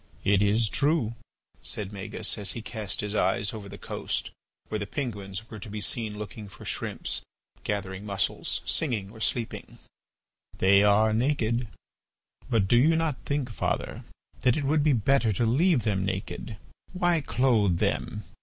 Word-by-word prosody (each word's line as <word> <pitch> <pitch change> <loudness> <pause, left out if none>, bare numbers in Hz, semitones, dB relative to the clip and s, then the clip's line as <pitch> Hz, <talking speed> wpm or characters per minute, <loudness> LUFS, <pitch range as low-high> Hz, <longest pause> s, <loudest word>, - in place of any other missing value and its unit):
"It 100 0 +4
is 105 +3 +3
true," 140 -3 +2 0.5
said 105 -1 -3
Magis 95 -1 -1
as 100 -3 -2
he 115 - -6
cast 110 -4 -2
his 105 -1 -2
eyes 100 +1 +1
over 105 -3 -7
the 100 - -8
coast - - -3 0.4
where 110 - -2
the 100 - -3
penguins 105 -5 -4
were 110 - -7
to 105 - -8
be 105 +1 -4
seen 105 +2 0
looking 105 0 -7
for - - -12
shrimps, - - -2 0.4
gathering 100 -1 -3
mussels, 100 -3 -1
singing, 110 -10 0
or 110 - -12
sleeping, 115 0 -2 0.8
"they 100 +1 +6
are 105 +1 +5
naked. 120 -1 +1 0.8
But 110 -5 +3
do 120 - +5
you 155 +7 +5
not 160 -4 -1
think, 140 -4 -1
father, - - -2 0.4
that 125 +1 +3
it 150 - -1
would 150 +2 +3
be 145 -1 +4
better 120 0 +3
to 115 +5 +1
leave 140 - +3
them 100 -3 +1
naked? 95 +3 -4 0.4
Why 175 -3 +2
clothe 115 -10 +2
them? - - -1
110 Hz, 160 wpm, -28 LUFS, 100-125 Hz, 0.8 s, they